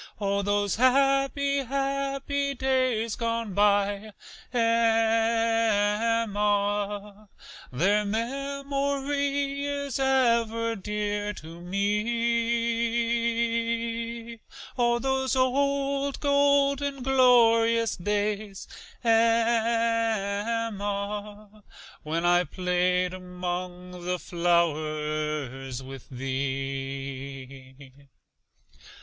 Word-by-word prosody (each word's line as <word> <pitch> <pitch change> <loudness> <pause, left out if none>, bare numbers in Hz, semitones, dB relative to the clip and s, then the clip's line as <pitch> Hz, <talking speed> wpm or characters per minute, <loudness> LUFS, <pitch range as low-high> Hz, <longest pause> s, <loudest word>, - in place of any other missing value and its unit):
CHORUS: - - -29
Oh, 200 -1 0
those 205 0 0
happy, 275 +2 +3
happy 275 +1 -2
days 255 -4 0
gone 230 -3 -2
by, 205 +1 +1 0.4
Emma, 225 -3 +1 0.4
Their 195 +11 +2
memory 280 +4 -2
is 280 -2 -3
ever 230 -4 +2
dear 210 0 -3
to 165 -2 -11
me; 230 +2 -1 0.4
Oh, 240 -1 +2
those 265 +1 0
old 275 +1 0
golden, 280 -1 +2
glorious 230 -3 +4
days, 205 +1 -2 0.4
Emma, 225 -2 0 0.4
When 165 +2 -2
I 175 0 +4
played 180 0 0
'mong 180 0 -6
the 180 +1 -1
flowers 155 -6 -1
with 135 0 -10
thee. 135 0 -5
225 Hz, 65 wpm, -26 LUFS, 195-245 Hz, 0.4 s, glorious